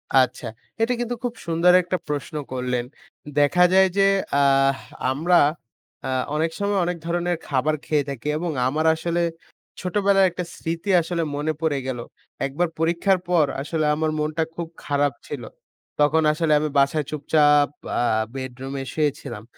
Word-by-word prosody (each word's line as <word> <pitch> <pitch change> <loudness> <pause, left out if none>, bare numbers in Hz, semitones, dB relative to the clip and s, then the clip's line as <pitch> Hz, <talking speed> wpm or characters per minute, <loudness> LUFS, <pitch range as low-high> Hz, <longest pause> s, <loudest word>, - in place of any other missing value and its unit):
আচ্ছা, 130 -1 +3 0.4
এটা 240 +2 +2
কিন্তু 240 0 -2
খুব 245 -1 -2
সুন্দর 170 +2 +4
একটা 180 +1 -2
প্রশ্ন 145 +1 -4 0.2
করলেন। 125 -1 -2 0.5
দেখা 145 +5 +4
যায় 190 0 +6
যে, 195 - +5 0.4
আ - - +4 0.7
আমরা 170 +6 +3 0.7
আ - - -3 0.3
অনেক 160 +2 0
সময় 200 0 +1
অনেক 175 0 -2
ধরনের 175 0 -1
খাবার 145 +3 +1
খেয়ে 150 -3 0
থাকি 135 0 -6
এবং 170 +1 -2 0.2
আমার 155 +4 0
আসলে 170 +1 -1 0.6
ছোটবেলার 195 +1 +3
একটা 180 +1 -4
স্মৃতি 165 +4 -4
আসলে 170 0 -2
মনে 150 +2 -1
পড়ে 150 -4 +1
গেল। 125 -2 -3 0.5
একবার 150 +6 0
পরীক্ষার 170 +4 +2
পর 170 -4 +4 0.2
আসলে 155 +1 -1
আমার 155 0 0
মনটা 155 +1 0
খুব 170 -1 -4 0.2
খারাপ 145 -1 +1
ছিল। 140 -5 -6 0.6
তখন 150 +2 +4
আসলে 155 0 0
আমি 155 0 -1
বাসায় 140 +1 +2
চুপচাপ 145 -1 +3 0.3
আ - - +2 0.3
বেডরুমে 135 +1 -5
শুয়েছিলাম। 145 -8 -2
155 Hz, 145 wpm, -23 LUFS, 145-175 Hz, 0.7 s, যায়